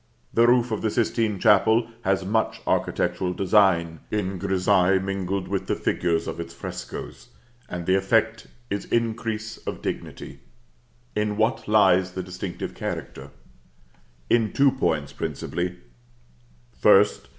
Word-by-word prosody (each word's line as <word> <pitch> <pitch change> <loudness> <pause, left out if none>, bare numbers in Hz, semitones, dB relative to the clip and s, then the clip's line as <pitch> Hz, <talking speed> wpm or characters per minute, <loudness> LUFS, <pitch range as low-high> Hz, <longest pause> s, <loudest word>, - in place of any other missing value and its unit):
The 115 +1 +5
roof 120 -1 +3
of 110 - -2
the 110 - 0
Sistine 110 -1 0
Chapel 110 +3 +4 0.2
has 95 0 +1
much 110 +3 0
architectural 90 -1 0
design 90 -4 +2
in 95 -3 -2
grissaille 95 0 +2
mingled 95 -1 -3
with 95 0 -3
the - - 0
figures 85 -2 0
of - - -5
its 85 0 -7
frescoes; - - -7 0.4
and 90 -1 -5
the 95 - +2
effect 110 +3 +1 0.2
is 100 - -2
increase 115 -1 -2
of - - -7
dignity. - - -6 0.8
In 105 -1 -1
what 110 +3 0
lies 95 -4 +4
the 95 - -4
distinctive 90 0 -6
character? 70 +1 -6 1.0
In 115 -2 +2
two 140 -1 +4
points, 80 - -1
principally: 90 0 -4 1.0
First. 100 +10 +4
100 Hz, 130 wpm, -24 LUFS, 90-110 Hz, 1.0 s, The